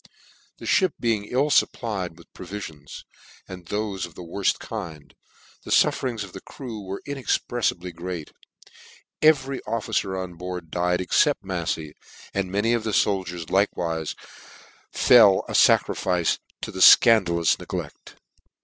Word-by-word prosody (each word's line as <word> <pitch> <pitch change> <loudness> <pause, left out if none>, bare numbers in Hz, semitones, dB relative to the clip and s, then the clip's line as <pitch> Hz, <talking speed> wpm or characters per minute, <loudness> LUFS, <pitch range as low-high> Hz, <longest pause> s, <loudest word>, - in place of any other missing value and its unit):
The - - -11
fhip 185 -6 +2
being 115 -4 0
ill 135 +6 0
fupplied 95 -12 0
with 85 - -19
provifi 95 0 -7
ons, 70 -2 -12 0.4
and 90 -2 -10
thofe 105 -3 -3
of 80 - -19
the 90 - -9
worft 95 +3 -1
kind, 80 -10 -8 0.5
the - - -11
fufferings 120 -5 +2
of 95 - -11
the 95 - -9
crew 120 -6 -8
were 95 +1 -7
inexprcffibly 120 -9 -2
great: 85 -2 -6 0.9
every 140 -4 +3
officer 105 -3 -2
on 90 -2 -6
board 90 -2 -7
died 90 +1 0
except 90 - +2
MafTey, 75 -2 -3 0.4
and 95 -2 -2
many 105 +4 +1
of 115 -2 0
the 110 - -3
foldiers 90 -5 -1
like 100 +2 +2
wife 80 -2 -3 0.8
fell 105 -6 +6
a - - -7
facrifice 90 -3 +2 0.2
to - - -5
the 95 - -7
fcandalous 95 -7 +6
negleft. - - -7
95 Hz, 140 wpm, -24 LUFS, 85-110 Hz, 0.9 s, fell